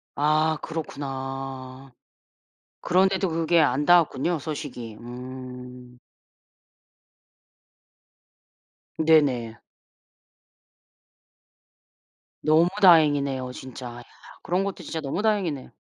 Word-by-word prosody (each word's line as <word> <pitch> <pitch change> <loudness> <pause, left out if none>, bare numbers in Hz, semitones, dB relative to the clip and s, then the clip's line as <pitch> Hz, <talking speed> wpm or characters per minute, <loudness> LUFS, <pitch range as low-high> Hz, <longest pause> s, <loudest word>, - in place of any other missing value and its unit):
아 155 +1 +2
그렇구나. 135 -3 -6 0.9
그런데도 190 +1 +2
그게 165 +1 +2
안 145 0 +2
닿았군요 170 -1 +3
소식이. 130 -7 -6
음. 125 0 -9 3.0
네네. 140 -8 +2 2.8
너무 160 +3 +4
다행이네요 145 -7 +4
진짜. 130 0 -9
야 120 - -10 0.4
그런 180 +2 0
것도 200 -1 -5
진짜 165 - -5
너무 145 +8 -3
다행이네. 190 -11 -1
145 Hz, 165 characters per minute, -25 LUFS, 130-165 Hz, 3.0 s, 너무